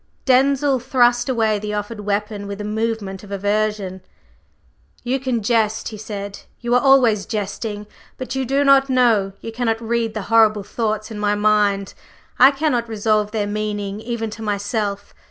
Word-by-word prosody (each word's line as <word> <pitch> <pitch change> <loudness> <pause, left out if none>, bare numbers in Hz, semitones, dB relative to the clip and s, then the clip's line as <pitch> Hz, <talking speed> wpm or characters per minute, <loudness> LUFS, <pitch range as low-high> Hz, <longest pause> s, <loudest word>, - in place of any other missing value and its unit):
Denzil 270 +1 +3
thrust 245 0 +2
away 220 -4 +1
the 210 0 -4
offered 210 +2 -4
weapon 205 0 -3
with 200 0 -6
a - - -4
movement 215 -2 -3
of 205 - -12
aversion. 205 -1 -1 1.0
"You 255 +2 -1
can 250 -4 -2
jest," 220 -1 +1
he 220 - -8
said. 200 -2 -6 0.2
"You 240 0 -2
are 245 - +4
always 250 -7 +4
jesting. 210 0 -4 0.3
But 255 - -5
you 265 0 -1
do 275 +3 +1
not 275 -1 +5
know 230 -7 +3
you 225 - -6
cannot 225 -1 -1
read 230 -1 -2
the 215 - -3
horrible 215 -2 +5
thoughts 215 +1 -3
in 210 - -6
my 205 0 +1
mind. 205 -2 +1 0.5
I 260 - +9
cannot 275 -5 -1
resolve 215 -1 +1
their 210 -1 -1
meaning 205 -1 -3
even 225 -1 -4
to 225 - -9
myself. 205 -1 -3
215 Hz, 165 wpm, -20 LUFS, 205-240 Hz, 1.0 s, I